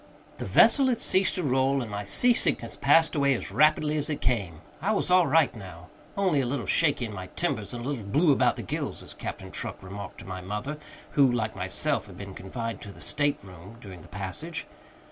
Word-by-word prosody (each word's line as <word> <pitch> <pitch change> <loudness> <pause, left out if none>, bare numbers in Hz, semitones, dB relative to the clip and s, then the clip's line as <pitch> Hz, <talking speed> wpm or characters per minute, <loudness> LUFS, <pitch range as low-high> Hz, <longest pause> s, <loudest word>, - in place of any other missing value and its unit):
The - - -4
vessel 275 -2 +5
had 250 -2 +2
ceased 190 -2 +2
to 180 - -2
roll, 135 0 +2
and 110 - -8
my 100 0 -3
sea 245 - +4
sickness 115 - 0
passed 155 +2 +4
away 140 -2 +3
as - - -5
rapidly 155 0 +3
as 150 +1 -2
it 150 - -2
came. 100 -11 -1 0.2
I - - +1
was - - 0
all 180 -2 +5
right 150 -1 +3
now, 90 -4 -11 0.3
"only 185 -8 +2
a - - -1
little 125 -3 -2
shaky 145 - +3
in 110 - -7
my 95 -2 -6
timbers 105 -2 -1
and 120 -1 -6
a - - -3
little 140 -6 -3
blue 150 - +3
about 135 - +3
the - - -6
gills," - - -4
as - - -9
Captain - - -7
Truck - - -5
remarked 100 +1 -8
to - - -12
my 95 -1 -6
mother, 105 +11 -5 0.3
who, 140 -3 +4
like 110 -3 -1
myself, 100 +10 -1
had 95 -3 -12
been 100 -1 -8
confined 115 +5 -5
to 100 - -9
the - - -15
state 145 -1 0
room 95 +3 -12
during 95 -6 -11
the - - -14
passage. 100 - -6
125 Hz, 220 wpm, -27 LUFS, 100-150 Hz, 0.3 s, vessel